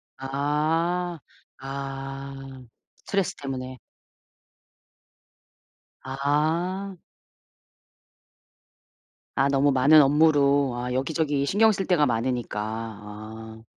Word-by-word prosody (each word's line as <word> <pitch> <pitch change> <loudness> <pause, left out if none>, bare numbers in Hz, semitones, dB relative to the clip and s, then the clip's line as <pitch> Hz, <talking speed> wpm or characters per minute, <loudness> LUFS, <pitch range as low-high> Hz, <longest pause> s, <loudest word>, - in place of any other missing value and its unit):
아. 155 +6 -1 0.4
아. 135 0 -6 0.6
스트레스 195 -3 -2
때문에. 130 -2 -6 2.3
아. 160 +8 -1 2.4
아 135 - +3
너무 140 +1 +3
많은 145 +4 +6
업무로 140 -2 +3
아 125 +1 -4
여기저기 145 +1 0
신경 220 +7 +4
쓸 195 -2 -2
데가 165 -5 +3
많으니까. 120 -2 -1
아. 110 0 -7
140 Hz, 145 characters per minute, -25 LUFS, 130-155 Hz, 2.4 s, 많은